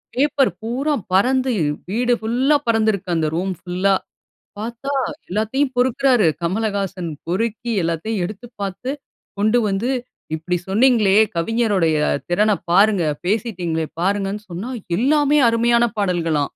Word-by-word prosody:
Paper 275 Hz, -3 st, +2 dB
பூரா 260 Hz, +7 st, -1 dB, 0.2 s
பறந்து, 255 Hz, +6 st, +3 dB, 0.4 s
வீடு 245 Hz, +3 st, +1 dB
ஃபுல்லா 255 Hz, +6 st, +2 dB
பறந்திருக்கு. 215 Hz, -4 st, +1 dB
அந்த 160 Hz, -1 st, +1 dB
ரூம் 185 Hz, +2 st, -1 dB
ஃபுல்லா. 185 Hz, +2 st, +1 dB, 0.7 s
பார்த்தா, 235 Hz, +5 st, -5 dB, 0.4 s
எல்லாத்தையும் 220 Hz, +8 st, 0 dB
பொறுக்கிறாரு, 250 Hz, -4 st, +3 dB, 0.2 s
கமலஹாசன். 195 Hz, -3 st, -2 dB, 0.2 s
பொறுக்கி 225 Hz, +6 st, -2 dB
எல்லாத்தையும் 175 Hz, +5 st, -2 dB
எடுத்து 210 Hz, +5 st, -8 dB, 0.2 s
பார்த்து, 200 Hz, +6 st, -4 dB, 0.5 s
கொண்டு 215 Hz, +4 st, +3 dB
வந்து, 200 Hz, +5 st, -1 dB, 0.5 s
இப்பிடி 175 Hz, +3 st, -2 dB
சொன்னீங்களே. 215 Hz, -2 st, +4 dB, 0.2 s
கவிஞருடைய 195 Hz, -5 st, +1 dB, 0.3 s
திறனப் 210 Hz, +3 st, +1 dB
பாருங்க. 200 Hz, 0 st, +4 dB, 0.2 s
பேசிட்டீங்களே! 180 Hz, -7 st, -1 dB, 0.2 s
பாருங்கன்னு 200 Hz, +2 st, -1 dB
சொன்னா, 185 Hz, +9 st, -5 dB, 0.3 s
எல்லாமே 290 Hz, +3 st, +3 dB
அருமையான 235 Hz, +1 st, +3 dB
பாடல்களாம் 165 Hz, -6 st, 0 dB
215 Hz, 110 wpm, -20 LUFS, 185-240 Hz, 0.7 s, சொன்னீங்களே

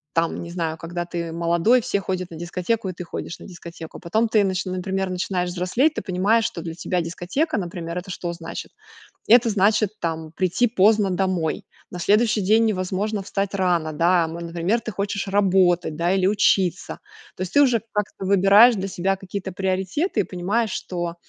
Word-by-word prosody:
там, 165 Hz, +1 st, 0 dB
не 170 Hz, -, -8 dB
знаю, 165 Hz, -2 st, -3 dB
когда 175 Hz, +1 st, -5 dB
ты 170 Hz, -1 st, -4 dB
молодой, 170 Hz, +9 st, +2 dB
все 200 Hz, -, -1 dB
ходят 185 Hz, -2 st, -3 dB
на 165 Hz, -, -9 dB
дискотеку, 185 Hz, +5 st, -2 dB
и 185 Hz, -, -3 dB
ты 180 Hz, -, -7 dB
ходишь 170 Hz, -, -6 dB
на -, -, -11 dB
дискотеку. 170 Hz, -2 st, -10 dB
Потом 220 Hz, +6 st, 0 dB
ты 215 Hz, -2 st, +4 dB
нач 185 Hz, -1 st, -1 dB
например 190 Hz, +1 st, -2 dB
начинаешь 180 Hz, 0 st, -2 dB
взрослеть, 185 Hz, -, +1 dB
ты -, -, -3 dB
понимаешь, 205 Hz, +4 st, +2 dB
что 170 Hz, -, -3 dB
для 165 Hz, -1 st, -6 dB
тебя 180 Hz, +1 st, -1 dB
дискотека, 185 Hz, -, -2 dB
например, 175 Hz, -2 st, -5 dB
это 185 Hz, +1 st, -6 dB
что 175 Hz, -1 st, -4 dB
значит- 165 Hz, -1 st, -7 dB, 0.6 s
это 235 Hz, +1 st, +6 dB
значит 210 Hz, +1 st, +3 dB
там 160 Hz, -1 st, -3 dB
прийти 190 Hz, +7 st, +1 dB
поздно 210 Hz, -1 st, +3 dB
домой. 180 Hz, -3 st, -1 dB, 0.2 s
На 180 Hz, -, -7 dB
следующий 210 Hz, +4 st, +2 dB
день 215 Hz, +4 st, +4 dB
невозможно 200 Hz, 0 st, -1 dB
встать 200 Hz, 0 st, -2 dB
рано, 175 Hz, -4 st, +1 dB
да, 170 Hz, +2 st, +3 dB
ам, 160 Hz, +1 st, -6 dB
например, 170 Hz, +7 st, -1 dB
ты 220 Hz, -, -5 dB
хочешь 200 Hz, +1 st, -3 dB
работать, 185 Hz, -5 st, +2 dB
да, 170 Hz, +3 st, +1 dB
или 190 Hz, -1 st, +2 dB
учиться. 195 Hz, -3 st, +1 dB, 0.4 s
То -, -, -9 dB
есть 185 Hz, -1 st, -4 dB
ты 290 Hz, -, +6 dB
уже 245 Hz, -5 st, +2 dB
как-то 210 Hz, -2 st, -3 dB
выбираешь 200 Hz, +5 st, +6 dB
для 195 Hz, -1 st, -3 dB
себя 195 Hz, +1 st, 0 dB
какие-то 190 Hz, 0 st, -6 dB
приоритеты 190 Hz, -, -1 dB
и -, -, +3 dB
понимаешь, 195 Hz, +5 st, -1 dB
что, 175 Hz, -2 st, -4 dB
185 Hz, 185 wpm, -23 LUFS, 175-205 Hz, 0.6 s, это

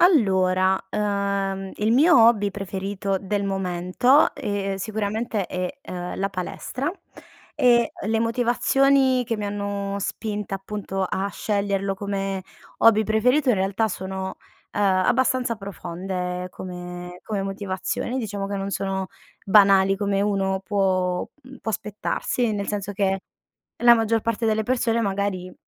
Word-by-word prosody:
Allora, 190 Hz, -, +4 dB
ehm, 200 Hz, -2 st, -1 dB
il 215 Hz, +2 st, +1 dB
mio 295 Hz, +7 st, +6 dB
hobby 205 Hz, -3 st, +3 dB
preferito 195 Hz, 0 st, -3 dB
del 200 Hz, +1 st, -1 dB
momento, 190 Hz, -, +2 dB
ehm, 195 Hz, -1 st, -2 dB
sicuramente 215 Hz, 0 st, -2 dB
è, 180 Hz, +5 st, -4 dB
ehm, 180 Hz, -1 st, -5 dB
la 195 Hz, -, 0 dB
palestra 200 Hz, -, -4 dB, 0.7 s
e 235 Hz, -2 st, +4 dB, 0.2 s
le 220 Hz, +1 st, +1 dB
motivazioni 255 Hz, +3 st, +3 dB
che 230 Hz, -1 st, -2 dB
mi 210 Hz, -, -4 dB
hanno 200 Hz, -1 st, -3 dB
spinta, 210 Hz, 0 st, -3 dB
appunto 195 Hz, 0 st, -4 dB
a 190 Hz, +1 st, -1 dB
sceglierlo 200 Hz, -2 st, -1 dB
come 195 Hz, -1 st, -3 dB, 0.4 s
hobby 220 Hz, -1 st, +6 dB
preferito, 250 Hz, +7 st, +2 dB
in 245 Hz, -, +4 dB
realtà 195 Hz, +4 st, +1 dB
sono, 190 Hz, 0 st, -5 dB, 0.3 s
ehm, -, -, -3 dB
abbastanza 235 Hz, +5 st, +2 dB
profonde 180 Hz, -2 st, -4 dB
come 180 Hz, -1 st, -8 dB
come 205 Hz, -3 st, -2 dB
motivazioni. 195 Hz, +5 st, -3 dB
Diciamo 205 Hz, -4 st, -3 dB
che 200 Hz, -, -4 dB
non 195 Hz, 0 st, -3 dB
sono 190 Hz, -1 st, -2 dB, 0.4 s
banali 195 Hz, -1 st, +5 dB
come 200 Hz, -1 st, 0 dB
uno 195 Hz, -2 st, 0 dB
può 185 Hz, -2 st, 0 dB, 0.2 s
mhmm, 260 Hz, +1 st, -12 dB
può 220 Hz, -, -3 dB
aspettarsi, 215 Hz, +3 st, -2 dB
nel 200 Hz, -1 st, -3 dB
senso 205 Hz, -1 st, -3 dB
che, 195 Hz, -1 st, 0 dB, 0.6 s
la 240 Hz, 0 st, +8 dB
maggior 225 Hz, -1 st, +2 dB
parte 230 Hz, 0 st, -1 dB
delle 220 Hz, 0 st, +1 dB
persone 235 Hz, -1 st, +1 dB
magari 195 Hz, -3 st, -2 dB
200 Hz, 130 wpm, -24 LUFS, 190-220 Hz, 0.7 s, la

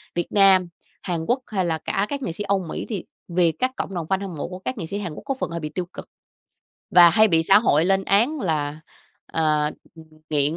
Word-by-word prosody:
Việt 175 Hz, -, -1 dB
Nam, 195 Hz, -3 st, +5 dB, 0.3 s
Hàn 170 Hz, -3 st, -3 dB
Quốc, 245 Hz, +7 st, +1 dB
hay 190 Hz, -4 st, -1 dB
là 165 Hz, -2 st, 0 dB
cả 195 Hz, -, 0 dB
các 280 Hz, -1 st, -4 dB
nghệ 250 Hz, -, -3 dB
sĩ 190 Hz, +5 st, -5 dB
Âu 200 Hz, -1 st, +1 dB
Mỹ -, -, -4 dB
thì 205 Hz, -6 st, -4 dB, 0.2 s
vì 175 Hz, -1 st, +2 dB
các 255 Hz, +11 st, -2 dB
cộng 195 Hz, -, -4 dB
đồng 170 Hz, -3 st, -4 dB
fan 190 Hz, +2 st, 0 dB
hâm 195 Hz, -4 st, -6 dB
mộ -, -, -4 dB
của 180 Hz, +1 st, -8 dB
các 255 Hz, +7 st, -4 dB
nghệ 180 Hz, -, -4 dB
sĩ 195 Hz, +5 st, -5 dB
Hàn 180 Hz, -6 st, -5 dB
Quốc -, -, -10 dB
có 275 Hz, -, -1 dB
phần -, -, -2 dB
hơi 170 Hz, 0 st, -4 dB
bị 155 Hz, -2 st, -5 dB
tiêu 180 Hz, +3 st, -4 dB
cực -, -, -10 dB, 0.8 s
và 175 Hz, -1 st, +8 dB
hay 215 Hz, +6 st, +5 dB
bị 165 Hz, -3 st, +3 dB
xã 195 Hz, +5 st, +6 dB
hội 160 Hz, -8 st, +2 dB
lên 195 Hz, +1 st, +1 dB
án 235 Hz, +12 st, +2 dB
là, 150 Hz, -5 st, -2 dB, 0.5 s
ờ, 150 Hz, -2 st, +1 dB, 0.2 s
ừm, 160 Hz, -1 st, -13 dB, 0.3 s
nghiện 150 Hz, +1 st, +1 dB
180 Hz, 245 wpm, -23 LUFS, 160-200 Hz, 0.8 s, và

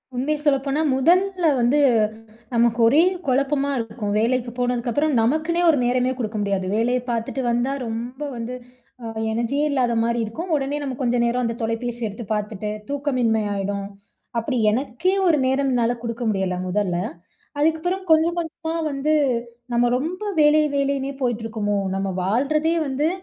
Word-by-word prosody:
உண்மைய 285 Hz, +5 st, 0 dB
சொல்லப்போனா 275 Hz, +1 st, +2 dB
முதல்ல 360 Hz, +6 st, +2 dB, 0.2 s
வந்து, 245 Hz, +5 st, +3 dB, 0.7 s
நமக்கு 235 Hz, 0 st, +2 dB
ஒரே 290 Hz, +8 st, +5 dB, 0.2 s
குழப்பமா 275 Hz, +2 st, +1 dB
இருக்கும். 220 Hz, -2 st, -3 dB
வேலைக்கு 240 Hz, +2 st, 0 dB
போனதுக்கப்புறம் 245 Hz, +4 st, 0 dB
நமக்குன்னே 315 Hz, +8 st, +1 dB
ஒரு 310 Hz, -, +4 dB
நேரமே 250 Hz, +1 st, +2 dB
குடுக்க 220 Hz, -3 st, -3 dB
முடியாது. 200 Hz, -2 st, -1 dB
வேலையை 245 Hz, +3 st, +1 dB
பார்த்துட்டு 230 Hz, +3 st, -2 dB
வந்தா 240 Hz, +3 st, 0 dB
ரொம்ப 240 Hz, +4 st, -5 dB, 0.2 s
வந்து 235 Hz, +2 st, -4 dB, 0.5 s
அ -, -, -6 dB, 0.3 s
எனர்ஜியே 235 Hz, +6 st, 0 dB
இல்லாத 255 Hz, -4 st, +1 dB
மாரி 235 Hz, +1 st, 0 dB
இருக்கும், 325 Hz, +12 st, -6 dB
உடனே 280 Hz, 0 st, -1 dB
நம்ம 275 Hz, -2 st, -3 dB
கொஞ்ச 245 Hz, -2 st, +1 dB
நேரம், 240 Hz, +1 st, +1 dB
அந்த 230 Hz, 0 st, -2 dB
தொலைபேசி 230 Hz, +2 st, -3 dB
எடுத்து 215 Hz, +3 st, -7 dB
பார்த்துட்டு, 210 Hz, 0 st, -3 dB, 0.2 s
தூக்கமின்மை 255 Hz, -6 st, +1 dB
ஆயிடும். 200 Hz, 0 st, -3 dB, 0.5 s
அப்டி 245 Hz, +3 st, -2 dB
எனக்கே 260 Hz, -, 0 dB, 0.2 s
ஒரு 325 Hz, -3 st, +4 dB
நேரம் 270 Hz, +1 st, +1 dB
என்னால 240 Hz, -1 st, +2 dB
குடுக்க 235 Hz, +1 st, -4 dB
முடியல 190 Hz, -3 st, 0 dB
முதல்ல. 185 Hz, -2 st, 0 dB, 0.6 s
அதுக்கப்புறம் 320 Hz, +5 st, +1 dB
கொஞ்சம் 320 Hz, +2 st, +4 dB
கொஞ்சமா 325 Hz, 0 st, -4 dB, 0.2 s
வந்து 285 Hz, +2 st, 0 dB, 0.6 s
நம்ம 240 Hz, 0 st, +3 dB
ரொம்ப, 325 Hz, +9 st, -3 dB, 0.2 s
வேலை 300 Hz, +1 st, +5 dB
வேலையினே 275 Hz, 0 st, 0 dB
போயிட்டு 240 Hz, -3 st, -1 dB
இருக்கோமோ? 210 Hz, -2 st, -1 dB, 0.2 s
நம்ம 195 Hz, 0 st, -1 dB
வாழ்றதே 285 Hz, -, +1 dB
வந்து 280 Hz, +3 st, 0 dB
250 Hz, 145 wpm, -22 LUFS, 230-290 Hz, 0.7 s, ஒரே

